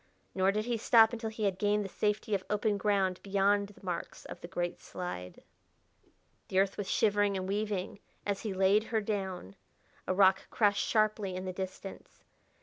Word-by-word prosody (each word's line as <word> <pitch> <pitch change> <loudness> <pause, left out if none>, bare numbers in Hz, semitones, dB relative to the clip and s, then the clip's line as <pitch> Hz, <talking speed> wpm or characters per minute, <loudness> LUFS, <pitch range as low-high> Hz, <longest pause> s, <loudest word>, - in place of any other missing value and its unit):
Nor 190 0 +3
did 215 +2 -1
he 240 -1 0
stop 225 0 +5
until 225 -1 -3
he 220 0 -5
had 195 -2 0
gained 205 0 +2
the - - -5
safety 210 +2 -1
of 195 -2 +1
open 210 0 +1
ground 195 -3 +1
beyond 200 +1 +2
the 200 -1 -16
marks 175 -2 -5
of - - -9
the - - -7
great 175 -1 -3
slide. 135 - -7 1.0
The 185 - -2
earth 195 0 +3
was 200 -2 -4
shivering 205 -2 +2
and 185 0 -3
weaving 200 -1 -2 0.3
as 200 -1 -1
he 215 - -3
laid 195 +3 +3
her 225 -1 0
down; 190 - -4 0.5
a - - +1
rock 190 0 +4
crashed 205 -3 +2
sharply 215 -3 +1
in 185 +1 -4
the 185 - -3
distance. 190 +1 -8
200 Hz, 180 wpm, -31 LUFS, 190-210 Hz, 1.0 s, stop